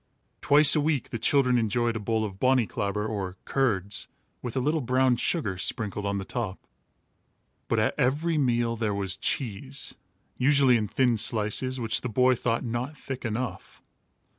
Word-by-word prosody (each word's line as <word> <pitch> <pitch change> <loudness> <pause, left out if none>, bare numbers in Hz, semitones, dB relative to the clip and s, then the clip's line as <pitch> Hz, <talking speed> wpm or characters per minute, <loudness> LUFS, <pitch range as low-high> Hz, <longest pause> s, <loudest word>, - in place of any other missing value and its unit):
Twice 150 +2 +7
a 150 - +2
week 145 -4 -1
the 115 - -4
children 125 -1 +3
enjoyed 115 +1 0
a - - -2
bowl 110 +1 -1
of 95 -2 -8
bonnyclabber 105 -5 0
or 95 -4 -4
curds, 105 -7 0 0.3
with 125 0 -5
a - - +3
little 150 +4 0
brown 130 0 +2
sugar 115 - -1
sprinkled 105 0 -2
on 100 0 -1
the 95 - -4
top. 110 -6 -5 1.0
But - - 0
at - - 0
every 150 +6 +1
meal 120 -3 +1
there 110 -3 -2
was 95 -2 0
cheese, 130 +5 -3 0.5
usually 135 -1 +4
in 110 -2 0
thin 120 +1 +1
slices, 115 +5 0
which 115 -2 0
the 125 - -4
boy 125 +3 +3
thought 115 -1 -1
not 125 +5 -4
thick 135 -2 -7
enough. 120 +2 -5
120 Hz, 165 wpm, -26 LUFS, 105-130 Hz, 1.0 s, Twice